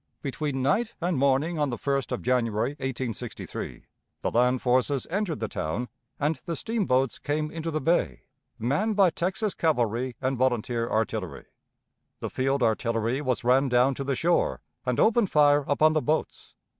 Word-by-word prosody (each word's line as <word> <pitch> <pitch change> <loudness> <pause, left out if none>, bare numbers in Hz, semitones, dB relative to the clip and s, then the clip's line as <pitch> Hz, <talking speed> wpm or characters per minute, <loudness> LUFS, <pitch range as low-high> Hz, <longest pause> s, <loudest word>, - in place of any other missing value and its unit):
Between 140 -1 -2
night 215 - +1
and 175 0 0
morning 140 +5 +1
on 145 -2 +1
the 120 - -3
1st 140 0 -1
of 125 - -3
January, 115 -2 +1
1863, 130 -5 -5 0.4
the - - -1
land 125 +2 +3
forces 130 +2 +1
entered 195 -4 -1
the 110 - -2
town, 100 +8 -3 0.3
and 150 +2 +1
the 170 - -1
steamboats 135 - 0
came 150 +1 -2
into 165 0 -4
the 155 -1 -1
bay, 165 +6 +1 0.3
manned 195 - 0
by 195 -4 +5
Texas 190 +5 -1
cavalry 125 -5 0
and 130 -1 -1
volunteer 120 -2 0
artillery. 110 -9 -2 0.7
The - - -5
field 135 0 0
artillery 115 +2 0
was 130 -4 -1
ran 130 +3 +3
down 125 +2 +4
to 140 - -4
the 135 0 -1
shore, 170 +6 +1 0.3
and 125 - 0
opened 225 -3 +4
fire 145 -1 +4
upon 155 +2 +4
the 155 - +2
boats. 155 +2 -2
135 Hz, 160 wpm, -27 LUFS, 125-155 Hz, 0.7 s, by